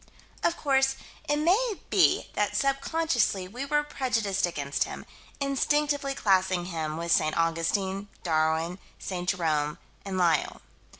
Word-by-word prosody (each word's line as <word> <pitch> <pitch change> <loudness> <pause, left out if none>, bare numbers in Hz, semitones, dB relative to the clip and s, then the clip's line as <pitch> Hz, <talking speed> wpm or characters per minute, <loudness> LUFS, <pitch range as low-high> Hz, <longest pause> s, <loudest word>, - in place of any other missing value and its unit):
Of 340 - +1
course 270 -2 +2 0.3
it 295 - +3
may 400 +9 +2 0.2
be - - +4
that - - 0
sub 275 0 +1
consciously 275 - +1
we 245 +8 -5
were 295 +1 +1
prejudiced 225 -10 0
against 145 -4 -1
him, - - -8 0.3
instinctively 280 0 +1
classing 185 -4 +2
him 160 -3 -3
with 170 0 -3
St. 155 -1 +3
Augustine, 190 +4 0 0.2
Darwin, 160 +2 +1 0.2
St. 180 -2 -4
Jerome, 155 -5 0 0.3
and 195 -1 -4
Lyell. 170 -5 +1
195 Hz, 130 wpm, -27 LUFS, 165-275 Hz, 0.3 s, be